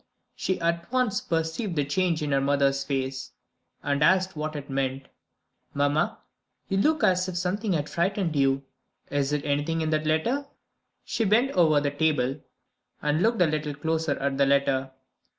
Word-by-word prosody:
She 190 Hz, -, -2 dB
at 170 Hz, +3 st, -1 dB
once 250 Hz, -6 st, +1 dB
perceived 165 Hz, +4 st, -2 dB
the 145 Hz, -2 st, +1 dB
change 165 Hz, +2 st, 0 dB
in 145 Hz, -, -2 dB
her 135 Hz, 0 st, +2 dB
mother's 140 Hz, 0 st, +2 dB
face 135 Hz, -1 st, -3 dB, 0.5 s
and 145 Hz, +1 st, +1 dB
asked 185 Hz, +3 st, +3 dB
what 155 Hz, 0 st, -4 dB
it 145 Hz, -1 st, -6 dB
meant. 135 Hz, -1 st, -2 dB, 0.7 s
"Mamma, 145 Hz, +2 st, +1 dB, 0.5 s
you 195 Hz, -, -1 dB
look 310 Hz, +10 st, +2 dB
as 185 Hz, 0 st, +3 dB
if 180 Hz, -, -4 dB
something 190 Hz, +3 st, -1 dB
had 150 Hz, -3 st, -1 dB
frightened 175 Hz, -1 st, -1 dB
you. 135 Hz, -1 st, +2 dB, 0.5 s
Is 145 Hz, 0 st, 0 dB
it 150 Hz, -1 st, -1 dB
anything 150 Hz, +3 st, 0 dB
in 160 Hz, 0 st, -1 dB
that 155 Hz, 0 st, 0 dB
letter?" 235 Hz, -, 0 dB, 0.6 s
She 240 Hz, -2 st, -1 dB
bent 225 Hz, +6 st, +3 dB
over 160 Hz, -, +4 dB
the 145 Hz, 0 st, -1 dB
table, 145 Hz, -3 st, 0 dB, 0.6 s
and 150 Hz, +2 st, 0 dB
looked 225 Hz, -3 st, +3 dB
a -, -, +4 dB
little 150 Hz, -2 st, -2 dB
closer 160 Hz, 0 st, -1 dB
at 135 Hz, 0 st, -2 dB
the 140 Hz, -, +5 dB
letter. 135 Hz, -1 st, +2 dB
155 Hz, 170 wpm, -26 LUFS, 140-185 Hz, 0.7 s, the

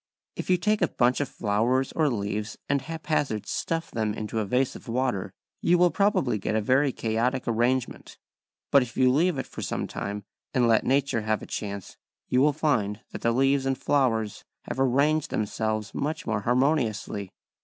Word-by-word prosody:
If -, -, -6 dB
you 180 Hz, -, +5 dB
take 210 Hz, +4 st, +1 dB
a -, -, +4 dB
bunch 125 Hz, +2 st, +2 dB
of 145 Hz, -, -2 dB
flowers 120 Hz, +5 st, 0 dB
or 155 Hz, -2 st, +2 dB
leaves 105 Hz, -2 st, -3 dB
and 140 Hz, -1 st, +1 dB
haphazard 155 Hz, -7 st, -2 dB
stuff 165 Hz, 0 st, -2 dB
them 110 Hz, -2 st, -1 dB
into 110 Hz, +1 st, -3 dB
a 110 Hz, -, 0 dB
vase 125 Hz, +6 st, +1 dB
of -, -, -11 dB
water, 120 Hz, -4 st, -1 dB, 0.3 s
you 175 Hz, -, +4 dB
will 175 Hz, 0 st, +4 dB
probably 195 Hz, -, +2 dB
get 105 Hz, -, -2 dB
a -, -, +3 dB
very 130 Hz, +6 st, +3 dB
chaotic 120 Hz, +3 st, -1 dB
arrangement. 120 Hz, +2 st, -1 dB, 0.5 s
But 140 Hz, -, +7 dB
if 125 Hz, -2 st, -5 dB
you 130 Hz, -1 st, +5 dB
leave 160 Hz, +4 st, +2 dB
it 135 Hz, -, -2 dB
for -, -, -8 dB
some -, -, -2 dB
time 100 Hz, 0 st, -5 dB, 0.3 s
and 125 Hz, -2 st, +4 dB
let 115 Hz, -1 st, +3 dB
nature 135 Hz, -3 st, +2 dB
have 110 Hz, 0 st, -1 dB
a -, -, -6 dB
chance 100 Hz, -2 st, -6 dB, 0.3 s
you 125 Hz, -, +3 dB
will 150 Hz, +2 st, +5 dB
find 115 Hz, -9 st, 0 dB
that -, -, -7 dB
the 115 Hz, -, +2 dB
leaves 135 Hz, +2 st, +2 dB
and 135 Hz, -1 st, 0 dB
flowers 115 Hz, -8 st, 0 dB, 0.2 s
have -, -, -5 dB
arranged 140 Hz, +4 st, +2 dB
themselves 110 Hz, 0 st, -2 dB
much 155 Hz, +2 st, -3 dB
more 110 Hz, -2 st, -1 dB
harmoniously. 120 Hz, -5 st, 0 dB
125 Hz, 185 wpm, -26 LUFS, 110-140 Hz, 0.5 s, But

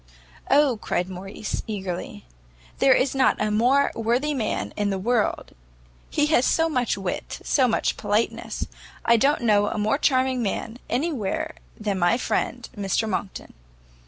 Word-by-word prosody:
"O," 280 Hz, -4 st, +4 dB
cried 180 Hz, -3 st, -2 dB
Morrice, 195 Hz, +3 st, -5 dB
eagerly, 190 Hz, -, -5 dB, 0.5 s
"there 265 Hz, -1 st, +6 dB
is 260 Hz, -, +1 dB
not 265 Hz, -1 st, +3 dB
a 215 Hz, 0 st, 0 dB
more 250 Hz, +6 st, +3 dB
worthy 240 Hz, +6 st, 0 dB
man 235 Hz, -6 st, -2 dB
in 205 Hz, -1 st, 0 dB
the 195 Hz, -, -1 dB
world! 220 Hz, +3 st, 0 dB, 0.6 s
he 295 Hz, -, +2 dB
has 300 Hz, -5 st, +3 dB
so 325 Hz, +4 st, +3 dB
much 250 Hz, -10 st, 0 dB
wit, 190 Hz, -2 st, -4 dB
so 260 Hz, -3 st, +3 dB
much 230 Hz, -, 0 dB
politeness! 210 Hz, +2 st, -1 dB, 0.4 s
I 235 Hz, -, +6 dB
don't 275 Hz, +4 st, +2 dB
know 205 Hz, -2 st, +4 dB
a -, -, -3 dB
more 215 Hz, +7 st, +1 dB
charming 260 Hz, -3 st, +2 dB
man 225 Hz, +2 st, -3 dB
anywhere 250 Hz, -, -1 dB, 0.3 s
than 205 Hz, -3 st, -1 dB
my 175 Hz, +6 st, +3 dB
friend 245 Hz, -1 st, -2 dB
Mr 205 Hz, +2 st, 0 dB
Monckton." 195 Hz, -1 st, -4 dB
230 Hz, 150 wpm, -24 LUFS, 205-260 Hz, 0.6 s, there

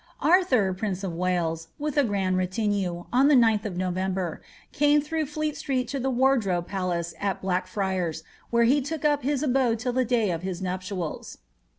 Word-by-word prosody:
A/thor, 270 Hz, -, +4 dB
prince 190 Hz, 0 st, -3 dB
of 185 Hz, -3 st, -3 dB
Wales* 165 Hz, -2 st, -1 dB
with 300 Hz, -1 st, -3 dB
a 290 Hz, -, +4 dB
grand 195 Hz, -5 st, 0 dB
retinue, 185 Hz, -1 st, -1 dB
on 265 Hz, +3 st, +5 dB
the 295 Hz, -, +6 dB
9th 225 Hz, -4 st, +4 dB
of 190 Hz, -4 st, -4 dB
Noi 185 Hz, 0 st, -1 dB
eer, 185 Hz, -2 st, -2 dB, 0.3 s
came 295 Hz, +1 st, +4 dB
through 310 Hz, +1 st, -2 dB
Fleet 305 Hz, +1 st, -2 dB
Street 255 Hz, -2 st, -2 dB
to 280 Hz, -, -2 dB
the 265 Hz, +1 st, -1 dB
Wardrobe 240 Hz, -9 st, +2 dB
Palace 175 Hz, -3 st, -2 dB
at 200 Hz, -2 st, -1 dB
Blackfi 185 Hz, -3 st, -1 dB, 0.3 s
where 235 Hz, 0 st, +3 dB
he 270 Hz, +5 st, +4 dB
took 305 Hz, +2 st, -4 dB
up 290 Hz, -1 st, +3 dB
his 280 Hz, +1 st, -1 dB
abode 255 Hz, -4 st, +2 dB
till 245 Hz, +2 st, -2 dB
the 255 Hz, +1 st, +2 dB
day 230 Hz, -5 st, +1 dB
of 165 Hz, -1 st, -3 dB
his 185 Hz, -1 st, -4 dB
nuptials. 185 Hz, -2 st, -4 dB
205 Hz, 185 wpm, -26 LUFS, 185-265 Hz, 0.3 s, the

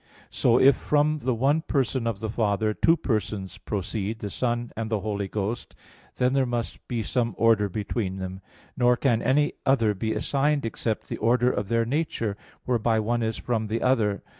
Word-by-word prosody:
So 120 Hz, 0 st, +3 dB
if 135 Hz, 0 st, +6 dB
from 150 Hz, +1 st, +1 dB
the 130 Hz, -3 st, 0 dB
one 140 Hz, +7 st, +2 dB
Person 130 Hz, -5 st, 0 dB
of 110 Hz, -2 st, -3 dB
the 110 Hz, -, -3 dB
Father, 110 Hz, -1 st, +1 dB
two 165 Hz, +9 st, +3 dB
persons 105 Hz, -, -3 dB
proceed, 105 Hz, +1 st, -3 dB
the 105 Hz, -2 st, -6 dB
Son 120 Hz, -1 st, -1 dB
and 110 Hz, 0 st, -3 dB
the 110 Hz, -3 st, -1 dB
Holy 100 Hz, -1 st, -2 dB
Ghost, 105 Hz, +3 st, -4 dB, 0.4 s
there 130 Hz, +1 st, +2 dB
must 120 Hz, -1 st, -4 dB
be 120 Hz, -3 st, -2 dB
some 115 Hz, -3 st, -1 dB
order 110 Hz, -3 st, +3 dB
between 100 Hz, -1 st, -3 dB
them. 95 Hz, 0 st, -6 dB, 0.3 s
Nor 125 Hz, -1 st, +3 dB
can 120 Hz, -3 st, +2 dB
any 145 Hz, +3 st, +2 dB
other 115 Hz, -6 st, +3 dB
be 110 Hz, +2 st, -2 dB
assigned 145 Hz, -1 st, +1 dB
except 115 Hz, -1 st, -3 dB
the -, -, -4 dB
order 125 Hz, +1 st, +3 dB
of 105 Hz, -, -3 dB
their 115 Hz, +1 st, +1 dB
nature, 120 Hz, -6 st, -1 dB, 0.3 s
whereby 115 Hz, -2 st, +1 dB
one 120 Hz, +2 st, 0 dB
is 110 Hz, -1 st, -1 dB
from 110 Hz, -3 st, -2 dB
the 115 Hz, +2 st, -2 dB
other. 110 Hz, -6 st, +1 dB
115 Hz, 180 wpm, -26 LUFS, 105-125 Hz, 0.4 s, if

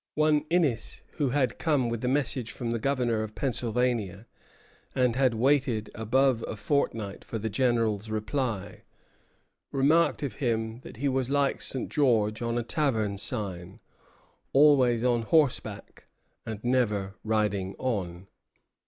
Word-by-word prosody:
One 150 Hz, -1 st, +3 dB
Innis, 155 Hz, -10 st, 0 dB
who 145 Hz, -4 st, +1 dB
had 130 Hz, -2 st, 0 dB
come 145 Hz, -7 st, +1 dB
with 115 Hz, 0 st, -3 dB
a -, -, 0 dB
message 130 Hz, -3 st, 0 dB
from 120 Hz, -2 st, -4 dB
the 115 Hz, -, -1 dB
Governor 125 Hz, -3 st, 0 dB
of 110 Hz, -1 st, -6 dB
Pennsylvania, 115 Hz, -4 st, -1 dB, 0.7 s
and 125 Hz, -2 st, +2 dB
had 130 Hz, -3 st, +2 dB
waited 125 Hz, -3 st, +1 dB
above 120 Hz, +2 st, +2 dB
a -, -, -4 dB
fortnight 110 Hz, -5 st, -1 dB
for 115 Hz, -, -5 dB
the 110 Hz, 0 st, -3 dB
General's 115 Hz, -4 st, +1 dB
reply, 110 Hz, -1 st, -3 dB, 0.9 s
remarked 150 Hz, +4 st, +3 dB
of 125 Hz, -7 st, -4 dB
him 115 Hz, -3 st, -1 dB
that 130 Hz, -, -12 dB
he 140 Hz, +4 st, -1 dB
was 130 Hz, -1 st, 0 dB
like 140 Hz, 0 st, +1 dB
St. 130 Hz, -, -3 dB
George 115 Hz, -7 st, +2 dB
on 115 Hz, 0 st, -1 dB
a 120 Hz, -, 0 dB
tavern 110 Hz, -8 st, 0 dB
sign, 95 Hz, -6 st, -5 dB, 0.7 s
always 135 Hz, -5 st, +5 dB
on 120 Hz, -2 st, +2 dB
horseback, 120 Hz, -6 st, 0 dB, 0.4 s
and 110 Hz, -1 st, -5 dB
never 105 Hz, -6 st, +1 dB
riding 105 Hz, -3 st, 0 dB
on. 95 Hz, -8 st, -3 dB
120 Hz, 135 wpm, -28 LUFS, 110-135 Hz, 0.9 s, always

